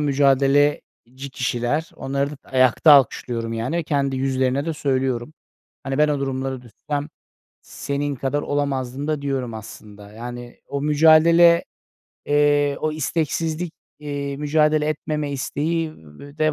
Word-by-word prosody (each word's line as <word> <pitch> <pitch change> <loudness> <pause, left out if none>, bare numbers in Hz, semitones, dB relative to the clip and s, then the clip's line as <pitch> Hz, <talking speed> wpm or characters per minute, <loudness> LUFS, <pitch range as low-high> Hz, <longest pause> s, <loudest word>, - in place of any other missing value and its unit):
mücadeleci 140 -2 +1
kişiler, 125 +4 -2
onları 140 +1 -2
d - - -7
ayakta 130 +4 +4
alkışlıyorum. 120 -4 +2
Yani, 130 +9 -2
kendi 140 -3 0
yüzlerine 130 +2 0
de 165 - -1
söylüyorum. 130 -1 -2 0.5
Hani, 135 +1 -3
ben 150 0 +4
o 145 -2 -1
durumlara 130 -1 -3
düşsem 145 +6 -5 0.5
senin 140 0 -4
kadar 135 +3 -2
olamazdım 140 -1 -2
da 150 -2 -1
diyorum 130 -5 -3
aslında. 105 -1 -11
Yani, 120 +1 -9
o 140 0 -3
mücadele, 160 +3 +5 0.6
eee, 145 -1 +2
o 155 - 0
isteksizlik, 160 +3 -2 0.3
eee, 140 -1 -4
mücadele 150 +1 +2
etmeme 150 -1 -3
isteği 155 +4 -2
de 140 - -6
v 155 - +3
140 Hz, 125 wpm, -22 LUFS, 130-150 Hz, 0.6 s, mücadele